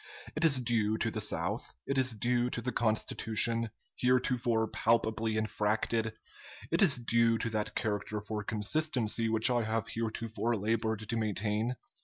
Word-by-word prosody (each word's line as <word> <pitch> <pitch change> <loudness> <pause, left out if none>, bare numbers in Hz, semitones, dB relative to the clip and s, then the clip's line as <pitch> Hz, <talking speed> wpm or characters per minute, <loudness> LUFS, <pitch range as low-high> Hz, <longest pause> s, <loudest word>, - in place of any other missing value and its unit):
It 155 - -1
is 145 -5 +5
due 110 -3 0
to - - -1
the - - -3
South; - - -2
it 140 - -2
is 130 -3 +3
due 120 +3 +1
to 120 - -4
the 125 - -1
Constitution, 115 0 +2 0.3
heretofore 125 -2 +1
palpably 110 0 0
infracted; 110 +1 -1 0.6
it 165 - +2
is 165 -8 +7
due 115 -1 +2
to 115 - -2
that 105 -1 -2
character 105 -1 -2
for 105 0 -5
consistency 115 +1 0
which 110 +3 +3
I 120 -1 +2
have 110 0 -2
heretofore 115 +1 -2
labored 110 0 -1
to 115 - -2
maintain. 110 +2 -1
115 Hz, 150 wpm, -31 LUFS, 110-120 Hz, 0.6 s, is